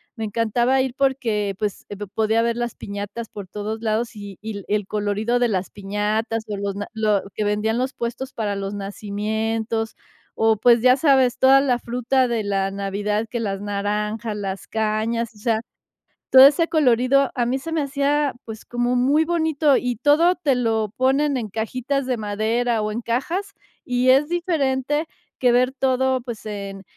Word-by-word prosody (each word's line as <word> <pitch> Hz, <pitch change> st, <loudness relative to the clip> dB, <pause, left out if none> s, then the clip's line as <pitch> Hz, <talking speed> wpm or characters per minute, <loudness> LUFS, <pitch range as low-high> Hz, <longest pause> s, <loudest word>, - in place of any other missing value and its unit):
Me 225 Hz, -, -5 dB
encantaba 235 Hz, +4 st, +1 dB
ir 260 Hz, -2 st, -2 dB
porque, 230 Hz, -7 st, 0 dB
pues, 210 Hz, -2 st, -3 dB
p 205 Hz, -, -6 dB, 0.2 s
podía 220 Hz, +1 st, +2 dB
ver 235 Hz, 0 st, 0 dB
las 240 Hz, -1 st, -3 dB
piñatas 205 Hz, +3 st, -6 dB
por 200 Hz, -2 st, -8 dB
todos 210 Hz, +3 st, -5 dB
lados, 225 Hz, +1 st, -1 dB
y 200 Hz, -2 st, -9 dB
y 220 Hz, +1 st, -5 dB
l -, -, -12 dB
el 210 Hz, -1 st, 0 dB
colorido 210 Hz, +3 st, 0 dB
de 245 Hz, -, +3 dB
las 190 Hz, -4 st, -2 dB
piñatas, 210 Hz, +3 st, -2 dB
o, 210 Hz, -, -3 dB
los 200 Hz, 0 st, -3 dB
na 205 Hz, 0 st, -5 dB
lo 215 Hz, -2 st, +1 dB
que 215 Hz, -, -2 dB
vendían 210 Hz, +2 st, 0 dB
los 260 Hz, +2 st, -1 dB
puestos 245 Hz, +3 st, -5 dB
para 205 Hz, -3 st, -2 dB
los 195 Hz, 0 st, -4 dB
nacimientos, 220 Hz, +3 st, -3 dB, 0.4 s
o, 225 Hz, 0 st, +3 dB
pues, 235 Hz, +2 st, +5 dB
ya 255 Hz, +1 st, +6 dB
sabes, 265 Hz, -4 st, +3 dB
toda 270 Hz, +1 st, +7 dB
la 255 Hz, -3 st, +2 dB
fruta 250 Hz, +2 st, 0 dB
de 230 Hz, -3 st, -1 dB
la 195 Hz, -1 st, 0 dB
Navidad, 205 Hz, +2 st, -2 dB
que 235 Hz, -, -3 dB
las 195 Hz, -3 st, -2 dB
naranjas, 210 Hz, +2 st, -2 dB
las 195 Hz, -2 st, -5 dB
cañas, 220 Hz, +1 st, -1 dB
o 210 Hz, -, -16 dB
sea 220 Hz, 0 st, +1 dB, 0.7 s
todo 260 Hz, +1 st, +11 dB
ese 330 Hz, +4 st, +1 dB
colorido 270 Hz, -2 st, +3 dB
a 240 Hz, -2 st, +1 dB
mí 260 Hz, +3 st, 0 dB
se 325 Hz, +4 st, -6 dB
me 315 Hz, -, +1 dB
hacía, 280 Hz, 0 st, 0 dB
pues, 220 Hz, -1 st, -8 dB
como 240 Hz, +1 st, -1 dB
muy 280 Hz, +6 st, +3 dB
bonito 315 Hz, -4 st, +2 dB
y 250 Hz, -3 st, -1 dB
todo 315 Hz, +8 st, +4 dB
te 290 Hz, -8 st, +1 dB
lo 220 Hz, -3 st, 0 dB
ponen 275 Hz, +3 st, +2 dB
en 225 Hz, -5 st, -3 dB
cajitas 255 Hz, +6 st, -2 dB
de 255 Hz, -1 st, 0 dB
madera, 220 Hz, +2 st, 0 dB
o, 210 Hz, 0 st, -2 dB
en 235 Hz, -, -3 dB
cajas 330 Hz, -, -2 dB, 0.3 s
y 250 Hz, 0 st, +1 dB
es 280 Hz, +3 st, +3 dB
diferente 300 Hz, -4 st, 0 dB, 0.3 s
que 250 Hz, -2 st, +4 dB
ver 250 Hz, +2 st, +3 dB
todo, 260 Hz, -1 st, +1 dB
pues, 235 Hz, -3 st, -8 dB
en 200 Hz, -2 st, -6 dB
230 Hz, 180 wpm, -22 LUFS, 210-260 Hz, 0.7 s, todo